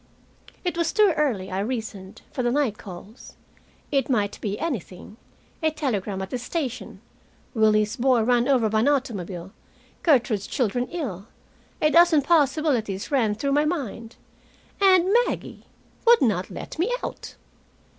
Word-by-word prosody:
It 350 -1 -1
was 335 -1 +1
too 415 -4 +4
early, 230 -12 -1
I 190 - -2
reasoned, 215 -3 -5
for 255 - -3
the 240 - +1
night 260 -6 0
calls. 195 +4 -11 0.6
It 275 -1 +1
might 205 -6 0
be 205 -1 -2
anything, 225 - -5 0.4
a 315 - +3
telegram 210 -10 -2
at 190 - -8
the 250 - -2
station, 250 - -5 0.5
Willie's 215 0 +2
boy 250 -2 +3
run 240 +1 +2
over 255 -5 +3
by 215 0 +1
an 230 - +2
automobile, 195 -10 -2 0.5
Gertrude's 245 - +2
children 245 -1 -1
ill. 225 - -5 0.6
A 305 - +4
dozen 335 -3 +5
possibilities 275 - +1
ran 225 -7 +2
through 275 +6 -2
my 295 +2 +3
mind. 240 - -4 0.7
And 380 -1 +5
Maggie - - -6 0.4
would 475 -6 +7
not 195 -7 0
let - - -8
me 385 +8 +1
out! - - -7
245 Hz, 145 wpm, -24 LUFS, 210-295 Hz, 0.7 s, would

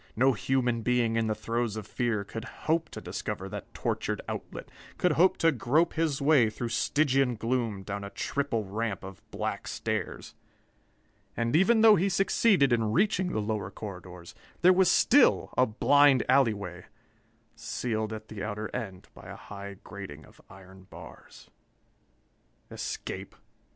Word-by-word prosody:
No 130 +3 +4
human 120 +1 0
being 120 -1 +1
in 115 -1 +1
the 110 - 0
throes 115 0 -2
of 110 -2 -6
fear 115 -2 -1
could 110 +2 -7 0.2
hope 160 0 +1
to - - -8
discover - - -5
that - - -8
tortured - - -2
outlet, - - -7 0.3
could 180 - +2
hope 175 +5 +4
to 165 - +4
grope 155 +6 +1
his 160 -4 0
way 140 -6 +4
through 115 +2 -5
Stygian 135 0 +1
gloom 115 -3 -2
down 100 +1 -5
a 100 - -6
triple 115 +2 -2
ramp 105 0 -3
of 95 -1 -10
black - - -4
stairs. - - -4 1.0
And 115 +3 0
even 220 +7 +4
though 220 -2 +8
he 190 +4 +1
succeeded 195 - +3
in 110 -2 +1
reaching 185 - +1
the - - -1
lower 105 0 -2
corridors, 90 -4 -9 0.3
there 185 +1 +8
was 185 -1 +4
still 280 0 +4
a 130 - +4
blind 140 +4 +4
alley 130 -4 +4
way, 90 -3 -8 0.7
sealed 110 -3 -3
at 110 0 -7
the 105 -3 -7
outer 105 0 -4
end 95 -7 -6
by - - -13
a - - -8
high 100 -1 -9
grating 95 -7 -9
of - - -20
iron 95 0 -15
bars.... - - -14 1.2
Escape! - - -6
115 Hz, 155 wpm, -28 LUFS, 105-145 Hz, 1.2 s, though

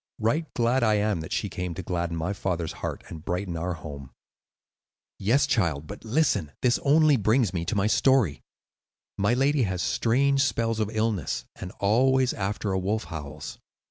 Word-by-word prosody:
Right 150 +9 0
glad 120 +2 +2
am 105 -2 +2
I - - -4
that 80 - -8
she - - -1
came 90 -2 -4
to 95 - -5
gladden 85 -1 -2
my 85 +5 -2
father's 90 -4 -2
heart - - -4
and 80 -2 -9
brighten 90 0 -3
our 85 +2 -2
home." 70 -4 -9 1.1
"Yes, 125 +9 +3
child, 85 - 0
but 100 +6 -9
listen; 115 - +1
this 125 -1 +3
only 150 0 +4
brings 110 -1 +2
me 85 -2 -2
to 115 - -2
my 100 0 +2
story. 110 - +3 0.8
My 100 +5 +3
lady 140 +2 +2
has 95 -5 -1
strange 135 +4 +2
spells 115 -4 0
of 105 -1 0
illness, 110 - -1
and 90 - -7
always 130 +5 +3
after 100 +1 -2
a 95 - 0
wolf 105 +4 -1
howls." 75 -1 -7
105 Hz, 175 wpm, -26 LUFS, 90-125 Hz, 1.1 s, only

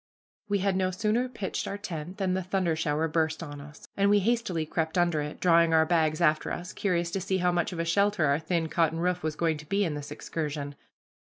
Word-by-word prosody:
We 205 - +2
had 195 0 0
no 185 0 +1
sooner 215 +7 0
pitched 210 -6 -4
our 200 - -3
tent 180 -2 -6
than 190 -3 0
the 190 - 0
thunder 185 -2 0
shower 160 0 0
burst 160 0 0
on 145 -2 -8
us, 150 +1 -13
and 200 0 +3
we 205 - +5
hastily 200 -6 0
crept 160 +2 -2
under 175 -3 +2
it, 150 0 -6
drawing 170 -2 +4
our 160 0 +5
bags 155 -2 +1
after 155 -2 +2
us, 175 - -5
curious 175 -4 0
to 195 - -2
see 190 +1 0
how 180 -1 +2
much 175 +1 0
of 175 - -6
a 165 - -1
shelter 200 0 +2
our 140 +1 +2
thin 165 0 -1
cotton 165 0 +1
roof 180 +1 0
was 155 -1 -2
going 160 -1 0
to 150 0 -12
be 200 +1 +2
in 160 - -2
this 145 -1 -6
excursion. 150 -1 -4
170 Hz, 235 wpm, -28 LUFS, 155-190 Hz, -, we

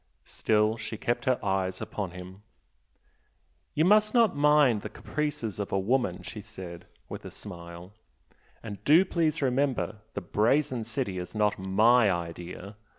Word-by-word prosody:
Still 110 +1 +1
she 110 -1 -6
kept 120 +2 -2
her 130 -1 +3
eyes 95 -1 0
upon 100 -4 -4
him. 90 +2 -10 1.3
"You 155 - +3
must 215 +3 +4
not 230 -7 +4
mind 145 -6 +4
the - - -6
caprices 140 -9 -3
of 100 - -3
a - - +1
woman!" 100 -3 0
she 90 +5 -7
said, 95 -5 -10 0.2
with - - -7
a - - -7
smile 85 -1 -10 0.7
"And 105 -3 -8
do 165 +6 +6
please 160 -4 0
remember 130 -4 0 0.2
the 100 - -2
'Brazen 120 +6 +1
City' 110 -5 -3
is 90 +4 -7
not 105 -1 +1
MY 110 +4 +4
idea! 90 +3 -5
110 Hz, 150 wpm, -28 LUFS, 95-135 Hz, 1.3 s, do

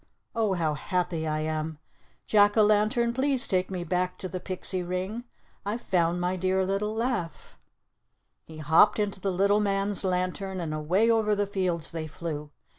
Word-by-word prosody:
Oh, 220 -4 +1
how 165 -4 0
happy 170 0 -2
I 155 0 -1
am! 155 0 -3 0.5
Jack 205 0 +4
o' 215 - +7
Lantern, 215 +3 +2
please 265 0 +3
take 185 -2 0
me 185 -2 -4
back 180 +2 -1
to 185 - -5
the 185 +1 -5
pixie 185 0 -2
ring. 185 +7 -4 0.4
I've 215 +4 -3
found 175 -2 +1
my 180 +1 0
dear 185 +1 +1
little 205 +3 -1
laugh!" 225 - -3 0.9
He 160 - -12
hopped 160 +6 +4
into 205 -2 -1
the 195 - -1
little 200 +3 +3
man's 200 -1 0
lantern, 185 +1 -2
and 160 -3 -3
away 180 +9 +2
over 215 -2 +2
the 205 0 0
fields 185 -5 -2
they 160 -2 -4
flew. 155 -2 -6
185 Hz, 170 wpm, -27 LUFS, 170-205 Hz, 0.9 s, o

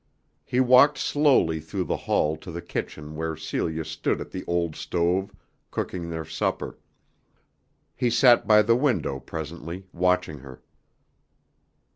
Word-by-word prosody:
He 125 +8 -1
walked 130 +3 +6
slowly 135 - +2
through 80 +4 -4
the 85 - -1
hall 75 +1 0
to 90 - -11
the 85 - -5
kitchen 75 0 -5
where 80 0 -3
Celia 80 -1 -3
stood - - -2
at - - -7
the 95 - -5
old 85 -2 -1
stove, 90 +3 0 0.4
cooking 85 -2 -4
their 80 -1 -4
supper. - - -3 1.2
He 125 -1 +1
sat 120 +1 +5
by 105 -1 +6
the 115 +2 +4
window 120 - 0
presently, 85 +5 -7
watching 90 -3 +1
her. 65 -1 -13
85 Hz, 135 wpm, -25 LUFS, 80-110 Hz, 1.2 s, walked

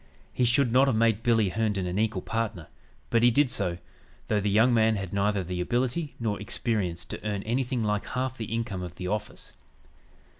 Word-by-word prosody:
He 125 - +2
should 125 +1 +3
not 130 +3 +5
have 130 - +2
made 115 -1 +2
"Billy" 115 -4 +3
Herndon 105 -2 -1
an 90 +3 -2
equal 110 -4 0
partner, 110 -7 -3 0.4
but 115 - +4
he 120 - +6
did 130 +2 +3
so, 90 -5 0 0.5
though 105 -1 +2
the 105 - 0
young 110 +5 +4
man 110 -1 +4
had 95 -2 -5
neither 100 0 +1
the 90 0 -3
ability 130 - -1
nor 110 -3 -2
experience 100 -6 -2
to - - -7
earn 105 -2 -2
anything 125 +1 -1
like 105 -1 -1
half 130 0 -2
the 115 - -5
income 115 -5 -2
of 90 -1 -7
the 90 0 -5
office. 105 +2 -4
110 Hz, 195 wpm, -27 LUFS, 100-120 Hz, 0.5 s, he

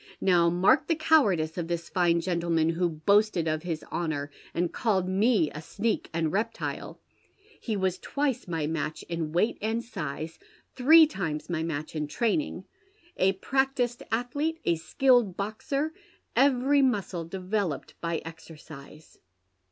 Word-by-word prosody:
Now 175 -3 +4
mark 175 +3 +3
the 330 - +2
cowardice 200 - +2
of 165 - -3
tins 170 0 -3
fine 170 -2 +2
gentleman, 170 -2 +1
who 170 +1 +1
boasted 175 +2 +2
of 155 0 0
his 165 -2 -4
honour, 145 -4 -2 0.2
and 175 0 -1
called 195 -6 +1
me 195 -3 +2
a 150 - -7
sneak 215 +7 -2
and 160 -2 -1
reptile! 220 +5 -3 0.6
He 220 -3 -2
was 185 -1 0
twice 280 -6 -2
my 165 -3 -2
match 155 0 -3
in 165 -2 -4
weight 180 +8 +1
and 225 +2 -1
size, 160 - -6 0.4
three 315 +5 +8
times 175 - -4
my 165 -2 -1
match 155 -1 -4
in 150 -1 -2
training, 235 - -1 0.5
a 190 +1 +3
practised 255 +2 0
atldete, 285 +8 -1
a - - +3
skilled 210 +5 +2
boxer, 265 +9 -2 0.4
every 275 +1 +4
muscle 200 -9 0
developed 185 -4 -3
by 170 -1 -2
exercise. 155 -2 -12
185 Hz, 140 wpm, -27 LUFS, 165-235 Hz, 0.6 s, three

